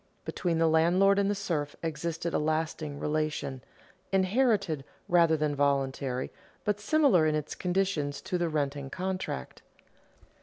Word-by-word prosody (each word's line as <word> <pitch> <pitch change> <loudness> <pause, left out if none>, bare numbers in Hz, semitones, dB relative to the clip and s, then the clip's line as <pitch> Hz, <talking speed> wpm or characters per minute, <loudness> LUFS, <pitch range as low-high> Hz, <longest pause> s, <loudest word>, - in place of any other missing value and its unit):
Between 175 -3 -1
the 165 0 +3
landlord 180 +5 +4
and 200 0 +2
the 205 - +1
serf 160 -7 -2
existed 165 +1 -3
a - - +2
lasting 155 -1 -2
relation, 150 -3 -2 0.5
inherited 195 - +2 0.2
rather 170 -2 +4
than 150 -1 0
voluntary, 135 -2 0 0.3
but 210 -1 0
similar 215 - +4
in 155 - +1
its 150 -1 -3
conditions 180 -6 -1
to 180 -3 -2
the 170 -1 0
renting 140 -2 -2
contract. 185 - -4
160 Hz, 130 wpm, -29 LUFS, 145-190 Hz, 0.5 s, landlord